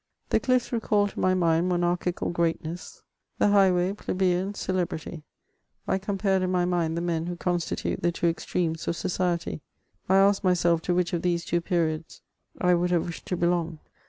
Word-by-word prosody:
The -, -, +3 dB
cliffs 255 Hz, -1 st, +1 dB
recalled 210 Hz, -3 st, +1 dB
to -, -, -8 dB
my 185 Hz, 0 st, +3 dB
mind 170 Hz, 0 st, +2 dB
monarchical 175 Hz, 0 st, 0 dB
greatness, 170 Hz, 0 st, -3 dB, 0.3 s
the -, -, +3 dB
high 200 Hz, -2 st, +5 dB
way 180 Hz, +2 st, +1 dB
plebeian 185 Hz, 0 st, -1 dB
celebrity; 175 Hz, -4 st, -3 dB, 0.7 s
I 190 Hz, -, +1 dB
compared 195 Hz, -1 st, 0 dB
in 185 Hz, -, 0 dB
my 180 Hz, -1 st, +1 dB
mind 170 Hz, -2 st, 0 dB
the -, -, -1 dB
men 170 Hz, -1 st, -1 dB
who 175 Hz, -, -3 dB
constitute 175 Hz, -1 st, -2 dB
the 175 Hz, -, +2 dB
two 170 Hz, -, -3 dB
extremes 165 Hz, -1 st, -2 dB
of -, -, 0 dB
society; 175 Hz, -2 st, -2 dB, 0.5 s
I 190 Hz, -, +5 dB
asked 195 Hz, +1 st, +4 dB
myself 175 Hz, -3 st, +3 dB
to 175 Hz, -, +1 dB
which 180 Hz, -1 st, 0 dB
of 170 Hz, -, 0 dB
these 175 Hz, -1 st, 0 dB
two 175 Hz, -, 0 dB
periods 165 Hz, -3 st, -2 dB, 0.4 s
I 180 Hz, 0 st, +3 dB
would 175 Hz, +1 st, +1 dB
have 175 Hz, -2 st, +1 dB
wished 170 Hz, -, -8 dB
to 180 Hz, -, -1 dB
belong. 170 Hz, -1 st, 0 dB
175 Hz, 180 wpm, -26 LUFS, 170-185 Hz, 0.7 s, high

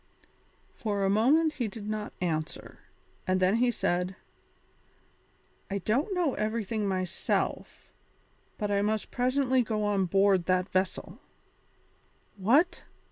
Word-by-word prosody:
For 205 Hz, -3 st, -2 dB
a 195 Hz, -, +2 dB
moment 295 Hz, +10 st, +3 dB
he 245 Hz, -6 st, -2 dB
did 210 Hz, 0 st, -8 dB
not 215 Hz, 0 st, -3 dB
answer, 155 Hz, -3 st, -3 dB, 0.5 s
and 185 Hz, 0 st, +2 dB
then 185 Hz, +4 st, +3 dB
he 245 Hz, +1 st, +3 dB
said: 180 Hz, -4 st, -1 dB, 1.5 s
"I 200 Hz, -, -1 dB
don't 270 Hz, -, 0 dB
know 340 Hz, -7 st, +1 dB
everything 215 Hz, -1 st, -2 dB
myself, 185 Hz, -2 st, -2 dB, 0.7 s
but 210 Hz, -1 st, -2 dB
I 200 Hz, 0 st, +2 dB
must 215 Hz, 0 st, -1 dB
presently 255 Hz, +1 st, +2 dB
go 215 Hz, -2 st, -1 dB
on 205 Hz, -2 st, +1 dB
board 195 Hz, 0 st, +3 dB
that 185 Hz, +1 st, +1 dB
vessel." 185 Hz, 0 st, -2 dB, 1.2 s
"What!" 280 Hz, -, +3 dB
210 Hz, 120 wpm, -29 LUFS, 190-245 Hz, 1.5 s, moment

